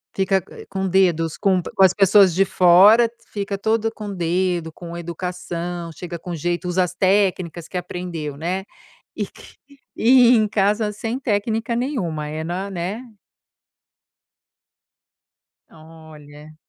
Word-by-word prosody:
Fica, 190 -1 +1
eh, - - -11
com 190 -1 -2
dedos 170 -4 +1
com 190 -3 +2
com 190 - 0
as 190 -1 +6
pessoas 195 -2 +5
de 195 +3 +3
fora, 195 +5 +6 0.2
fica 200 -1 -3
todo 225 +2 0
com 210 -2 -7
dedo, 175 -1 -1
com 170 +1 -9
educação, 175 0 -5
chega 170 +2 -7
com 170 +1 -6
jeito, 175 +3 -2
usa 180 +1 +1
as 180 0 -5
técnicas 185 -4 0
que 185 - -5
aprendeu, 175 -5 -5
né, 180 +5 -3 0.5
e - - -3
que, - - -16 0.4
e 245 +1 +6
em 215 -1 +3
casa 210 +1 +1
sem 225 +4 -4
técnica 225 0 -1
nenhuma, 190 - -2
é 155 +1 -5
na 185 +4 -4
né. 195 +8 -5 2.6
Olha. 155 -2 -14
185 Hz, 135 wpm, -21 LUFS, 170-205 Hz, 2.6 s, as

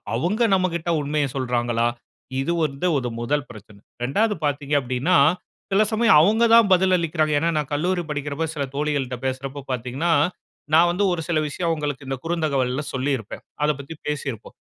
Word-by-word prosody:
அவுங்க 185 - 0
நம்மகிட்ட 175 -3 0
உண்மைய 145 0 0
சொல்றாங்களா? 120 -3 0 0.5
இது 170 +5 -1
வந்து 150 +3 -1
ஒரு 125 -2 -2
முதல் 145 +4 0
பிரச்சனை. 105 -1 -13 0.2
2வது 210 - +1
பார்த்தீங்க 145 0 -1
அப்டின்னா, 130 +7 +1 0.5
சில 210 +2 +4
சமயம் 225 -5 +4
அவுங்க 220 +6 +4
தான் 225 -4 +6
பதில் 185 0 +4
அளிக்கிறாங்க. 155 -2 0
ஏன்னா, 165 +3 +1
நான் 150 -1 -4
கல்லூரி 175 +4 0
படிக்கிறப்ப, 145 +2 -3
சில 140 - -1
தோழிகள்ட்ட 140 -4 -1
பேசுறப்ப 135 +1 -4
பாத்தீங்கன்னா, 130 +7 -1 0.6
நான் 170 +2 +6
வந்து, 185 +4 0
ஒரு 165 -2 -3
சில 165 -2 +2
விஷயம் 170 +3 -2
அவங்களுக்கு 145 -3 -3
இந்த 135 -1 -3
குறுந்தகவல்ல 145 -5 -1
சொல்லிருப்பேன். 130 -4 -3 0.2
அதப் 150 -2 0
பத்தி 160 +4 -9
பேசியிருப்போம். 140 -6 -5
150 Hz, 155 wpm, -23 LUFS, 130-170 Hz, 0.6 s, தான்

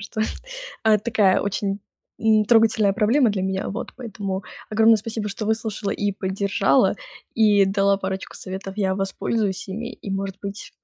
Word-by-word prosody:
что, 215 +2 -5 0.6
а, 220 -1 +6
это 210 - 0
такая 210 -5 +3
очень 200 0 -2 0.4
н 215 -1 +4
трогательная 220 -2 +4
проблема 230 +5 +3
для 190 -2 -2
меня. 190 0 -2
Вот. - - -5
Поэтому 200 -5 -5 0.3
огромное 220 +1 +5
спасибо, 220 0 -4
что 210 +2 -5
выслушала 220 -2 -1
и 205 0 -1
поддержала, 195 +1 +1 0.4
и 210 -3 +5
дала 195 0 +2
парочку 190 0 -5
советов. 195 +1 -6
Я 190 -2 +1
воспользуюсь 195 +1 -2
ими, 230 +5 -5
и, 200 - -8
может 195 0 -3
быть, 200 0 -7
205 Hz, 155 wpm, -23 LUFS, 195-220 Hz, 0.6 s, а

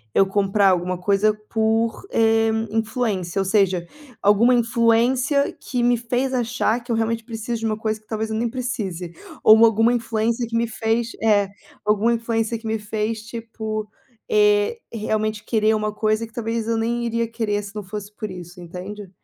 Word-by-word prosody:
eu 195 - +6
comprar 195 0 +3
alguma 180 0 +1
coisa 200 +3 +2 0.2
por, 225 - 0
eh, 225 0 +3 0.2
influência, 220 -5 -1
ou 195 - -1
seja, 190 -4 +2 0.3
alguma 210 +5 +5
influência 240 +4 +2
que 250 -2 -3
me 245 0 +4
fez 245 +3 -1
achar 240 -1 0
que 245 - -6
eu 230 - +2
realmente 225 0 -1
preciso 225 0 -4
de - - -2
uma 215 -1 -1
coisa 215 0 -2
que - - -34
talvez 220 0 -3
eu 220 - -1
nem 235 +1 0
precise. 215 -9 -4 0.3
Ou 220 +1 +8
alguma 225 +1 +4
influência 230 0 0
que 230 - -5
me 235 - +1
fez 225 +1 -1
eh, 205 -3 +4 0.4
alguma 210 +3 +3
influência 230 -1 -1
que 225 - -8
me 220 0 0
fez 215 +1 -3
tipo, 220 -2 -5 0.4
eh, 210 - +3 0.2
realmente 215 -1 -1
querer 220 -1 +2
uma 215 0 -1
coisa 215 +1 0
que 225 - -24
talvez 225 -1 -2
eu 230 0 +1
nem 235 +1 -1
iria 230 0 0
querer, 210 -3 -1
se 200 +1 -9
não 210 - -4
fosse 205 +1 -7
por 215 -1 -5
isso, 180 0 -10
entende? 185 +3 -8
220 Hz, 180 wpm, -22 LUFS, 210-230 Hz, 0.4 s, Ou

